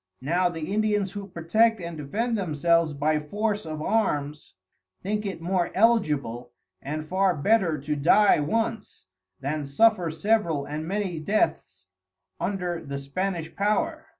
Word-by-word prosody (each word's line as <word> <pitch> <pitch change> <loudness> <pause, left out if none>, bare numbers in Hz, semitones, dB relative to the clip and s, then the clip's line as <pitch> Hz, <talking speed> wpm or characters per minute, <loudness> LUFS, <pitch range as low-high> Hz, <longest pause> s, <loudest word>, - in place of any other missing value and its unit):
Now 175 +6 +1
the 165 +2 -5
Indians 210 -2 +1
who 200 -1 -7
protect 215 +6 +2
and 170 -1 -6
defend 215 - -2
themselves 170 -3 +1
by 150 +2 +1
force 205 +5 -2
of 155 -1 -5
Arms, 150 - -1 0.5
think 210 +2 -2
it 175 -4 -6
more 180 0 0
eligible, 145 - +1 0.3
and 155 +2 -5
far 185 +1 +2
better 180 0 +2
to 150 +1 -2
dye 185 +7 +5
once, 225 - -2 0.4
than 145 +2 -2
suffer 175 +5 +3
several 165 -3 0
and 150 +2 -5
many 190 -3 -2
Deaths 210 - -1 0.5
under 180 -4 -2
the 140 0 -5
Spanish 165 +4 -3
Power. 205 +2 0
175 Hz, 135 wpm, -26 LUFS, 150-210 Hz, 0.5 s, dye